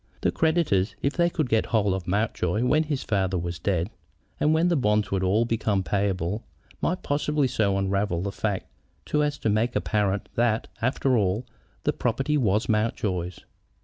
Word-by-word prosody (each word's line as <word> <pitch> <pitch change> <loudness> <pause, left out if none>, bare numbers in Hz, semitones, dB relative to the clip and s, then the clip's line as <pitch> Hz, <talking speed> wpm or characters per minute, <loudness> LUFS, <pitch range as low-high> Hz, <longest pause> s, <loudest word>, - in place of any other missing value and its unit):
The - - +2
creditors, 160 - +1
if 140 - +1
they 170 0 +2
could 155 -5 -1
get 110 -2 +1
hold 105 -4 +2
of 95 -2 -4
Mountjoy 105 +1 0
when 150 +5 +4
his 145 -3 -2
father 95 -3 0
was 85 0 -4
dead, 90 +2 0 0.5
and 150 - +3
when 160 +2 +3
the 175 - +2
bonds 105 -6 +1
would 95 -1 +1
all 100 +5 +2
become 110 -4 0
payable, 100 +1 -1 0.4
might 180 +1 -1
possibly 145 0 +1
so 105 -6 +1
unravel 95 -2 0
the 100 - -2
facts 100 -2 -2 0.5
as 150 -1 +2
to 110 - -1
make 110 +3 +1
it - - -20
apparent 100 -2 0
that, 115 -2 +1
after 130 +2 +1
all, 105 +2 +1 0.4
the - - +1
property 150 +3 0
was 110 -6 +2
Mountjoy's. 100 -5 -1
105 Hz, 175 wpm, -26 LUFS, 95-130 Hz, 0.5 s, when